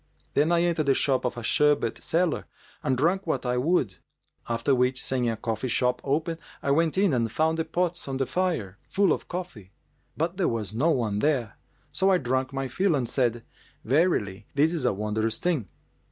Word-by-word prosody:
Then 150 Hz, +4 st, +3 dB
I 170 Hz, 0 st, +3 dB
entered 165 Hz, -4 st, 0 dB
the 135 Hz, -, +4 dB
shop 135 Hz, -3 st, +2 dB
of 125 Hz, -, -2 dB
a 120 Hz, -, -5 dB
sherbet 145 Hz, -2 st, +2 dB
seller 170 Hz, 0 st, 0 dB, 0.3 s
and 130 Hz, -1 st, 0 dB
drank 175 Hz, +7 st, +1 dB
what 135 Hz, -5 st, -1 dB
I 125 Hz, 0 st, 0 dB
would; 130 Hz, -, +1 dB, 0.5 s
after 115 Hz, +4 st, +1 dB
which, 125 Hz, 0 st, +2 dB
seeing 125 Hz, -2 st, 0 dB
a 115 Hz, -, -2 dB
coffee 115 Hz, +3 st, -3 dB
shop 125 Hz, +1 st, +1 dB
open, 160 Hz, +4 st, -1 dB, 0.2 s
I 140 Hz, -, +1 dB
went 160 Hz, +3 st, +2 dB
in 195 Hz, -5 st, +3 dB
and 115 Hz, -3 st, 0 dB
found 160 Hz, +4 st, +1 dB
the 160 Hz, -, 0 dB
pots 175 Hz, 0 st, -1 dB
on 135 Hz, -1 st, -2 dB
the 135 Hz, -, 0 dB
fire, 130 Hz, -, -2 dB
full 200 Hz, -1 st, +3 dB
of -, -, -5 dB
coffee;[FN#396] 175 Hz, -, -6 dB, 0.5 s
but -, -, -1 dB
there -, -, +2 dB
was 110 Hz, -3 st, -3 dB
no 140 Hz, +9 st, +2 dB
one 115 Hz, -9 st, 0 dB
there. 130 Hz, -5 st, 0 dB, 0.4 s
So 190 Hz, +1 st, +2 dB
I 190 Hz, -, +5 dB
drank 130 Hz, -2 st, -1 dB
my 135 Hz, 0 st, -3 dB
fill 185 Hz, +6 st, +1 dB
and 130 Hz, -4 st, -1 dB
said, 120 Hz, -2 st, 0 dB, 0.4 s
'Verily, 115 Hz, -, +1 dB
this 155 Hz, +4 st, +3 dB
is 155 Hz, -7 st, -2 dB
a 125 Hz, -, +4 dB
wondrous 105 Hz, +2 st, -1 dB
thing! 160 Hz, -, -1 dB
135 Hz, 195 wpm, -26 LUFS, 115-165 Hz, 0.5 s, I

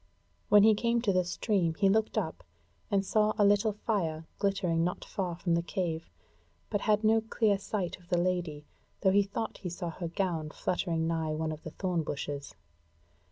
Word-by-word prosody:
When 205 Hz, -1 st, +7 dB
he 220 Hz, 0 st, +7 dB
came 235 Hz, +2 st, +1 dB
to 200 Hz, -5 st, +2 dB
the 185 Hz, 0 st, +3 dB
stream 175 Hz, -2 st, 0 dB
he 195 Hz, +3 st, +3 dB
looked 220 Hz, +3 st, +2 dB
up -, -, -2 dB, 0.5 s
and 200 Hz, -2 st, +1 dB
saw 215 Hz, +2 st, +2 dB
a 205 Hz, -, +5 dB
little 205 Hz, +1 st, +3 dB
fire 170 Hz, -7 st, -2 dB
glittering 195 Hz, -5 st, +1 dB
not 180 Hz, +1 st, -2 dB
far 180 Hz, -3 st, -3 dB
from 170 Hz, 0 st, -1 dB
the 170 Hz, -, +3 dB
cave, 170 Hz, -1 st, -3 dB, 0.6 s
but 205 Hz, -, 0 dB
had 215 Hz, 0 st, +2 dB
no 220 Hz, +1 st, +4 dB
clear 220 Hz, -2 st, +1 dB
sight 195 Hz, -3 st, -3 dB
of 175 Hz, -1 st, -22 dB
the 175 Hz, -, +2 dB
Lady, 175 Hz, -4 st, -1 dB, 0.4 s
though 190 Hz, -, +4 dB
he 200 Hz, +1 st, +5 dB
thought 200 Hz, +3 st, -4 dB
he 180 Hz, -, -4 dB
saw 175 Hz, 0 st, -4 dB
her 170 Hz, +1 st, -5 dB
gown 170 Hz, -3 st, -2 dB
fluttering 165 Hz, 0 st, -1 dB
nigh 160 Hz, -2 st, -1 dB
one 160 Hz, 0 st, -2 dB
of 155 Hz, 0 st, -7 dB
the -, -, -7 dB
thorn 180 Hz, +1 st, -1 dB
bushes. 145 Hz, -1 st, -5 dB
180 Hz, 190 wpm, -30 LUFS, 165-205 Hz, 0.6 s, When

